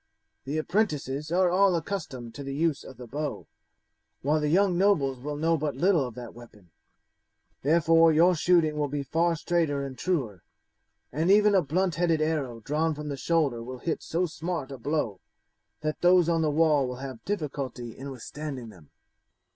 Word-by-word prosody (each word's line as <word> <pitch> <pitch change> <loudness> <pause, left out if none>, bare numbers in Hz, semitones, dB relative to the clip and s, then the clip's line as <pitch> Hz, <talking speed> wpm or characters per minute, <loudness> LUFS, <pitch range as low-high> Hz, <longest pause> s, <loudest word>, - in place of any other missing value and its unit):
"The 145 +3 -2
apprentices 155 -5 -1
are 180 0 +3
all 190 0 +4
accustomed 155 - -5
to 145 - -7
the 135 0 -5
use 160 -1 0
of 130 - -12
the 125 - -9
bow, 145 +4 -4 0.8
while 150 +3 +2
the 150 - 0
young 185 +2 +3
nobles 160 -9 +2
will 145 +3 -5
know 165 +2 +1
but 150 -2 -2
little 165 -2 +2
of 120 - -10
that 120 -2 -8
weapon; 105 -7 -16 0.9
therefore 165 +2 +4
your 170 +4 +5
shooting 160 -2 +2
will 145 - +1
be 145 0 -3
far 165 +4 +1
straighter 155 -4 0
and 135 -1 -7
truer, 130 - -2 0.7
and 160 +6 0
even 205 +1 +5
a 190 - +5
blunt 170 +2 0
headed 165 -3 +2
arrow 145 -7 -1
drawn 155 +5 0
from 150 0 -6
the 140 - -3
shoulder 140 -5 0
will 130 +2 -7
hit 160 +6 -3
so 175 +3 -1
smart 165 -4 -4
a 135 - -7
blow 120 -7 -2 0.6
that 155 0 -3
those 180 -1 +5
on 165 -1 +2
the 155 - +2
wall 150 -3 +3
will 125 - -5
have 130 -2 -8
difficulty 140 - -4
in 140 +2 -7
withstanding 135 -1 -7
them." 85 -8 -16
150 Hz, 180 wpm, -27 LUFS, 135-170 Hz, 0.9 s, your